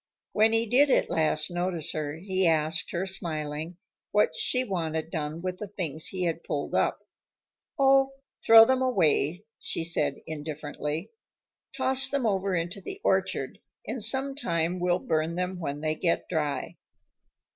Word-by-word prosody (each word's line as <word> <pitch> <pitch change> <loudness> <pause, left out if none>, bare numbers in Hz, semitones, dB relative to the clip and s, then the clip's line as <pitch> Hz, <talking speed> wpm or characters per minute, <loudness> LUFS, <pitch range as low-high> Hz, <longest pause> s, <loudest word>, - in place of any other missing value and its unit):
When 220 +1 +3
he 225 0 +2
did 260 +6 +4
at - - +2
last 155 0 +1
notice 175 -2 -1
her 150 -1 -4
he 190 +1 0
asked 160 0 +1
her, 175 +2 -2
smiling, 160 -3 -3 0.3
what 210 0 +2
she 255 0 0
wanted 165 -7 -3
done 155 +1 -4
with 185 0 -4
the 210 - -5
things 165 -6 -3
he 185 -1 -3
had 165 -1 -2
pulled 145 - -4
up. - - +1 0.8
"Oh, 270 0 +4 0.3
throw 225 0 +9
them 260 +2 +1
away," 180 - +1
she - - -3
said 165 0 +2
indifferently. 150 +3 -5 0.7
"Toss 265 0 +5
them 280 -3 -1
over 195 -2 0
into 175 +4 -3
the 385 - -7
orchard, - - 0 0.3
and 245 - -1
sometime 225 - +1
we'll 175 0 +1
burn 160 -1 -1
them 180 0 -3
when 145 -3 -4
they 155 0 0
get 170 +2 -1
dry." 150 -4 -3
175 Hz, 150 wpm, -27 LUFS, 155-210 Hz, 0.8 s, throw